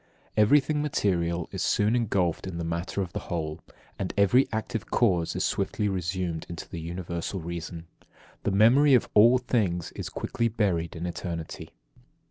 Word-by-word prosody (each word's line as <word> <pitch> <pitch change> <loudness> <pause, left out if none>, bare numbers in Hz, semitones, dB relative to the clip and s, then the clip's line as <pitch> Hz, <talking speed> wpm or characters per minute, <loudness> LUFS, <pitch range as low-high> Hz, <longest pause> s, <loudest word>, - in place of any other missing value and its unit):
10. 110 - +4
Everything 145 +4 +3
material 85 - 0
is - - -4
soon 105 +3 +2
engulfed 95 -7 0
in 90 -3 -5
the 85 - -3
matter 85 +4 -2
of 90 -1 -8
the - - -2
whole, 80 -3 -3 0.4
and - - -3
every 100 +7 +5
active 110 0 -3
cause 90 -8 +2
is - - 0
swiftly 100 +2 0
resumed 90 -3 -2
into 85 -2 -7
the 85 -3 -6
Universal 85 +2 -4
reason. 85 0 -6 0.6
The - - -1
memory 125 +8 +6
of 120 - +2
all 115 +4 +7
things 105 -9 -1
is - - -6
quickly 115 - -1
buried 95 -8 0
in 85 +1 -4
eternity. 85 -2 -5
95 Hz, 160 wpm, -27 LUFS, 85-110 Hz, 0.6 s, all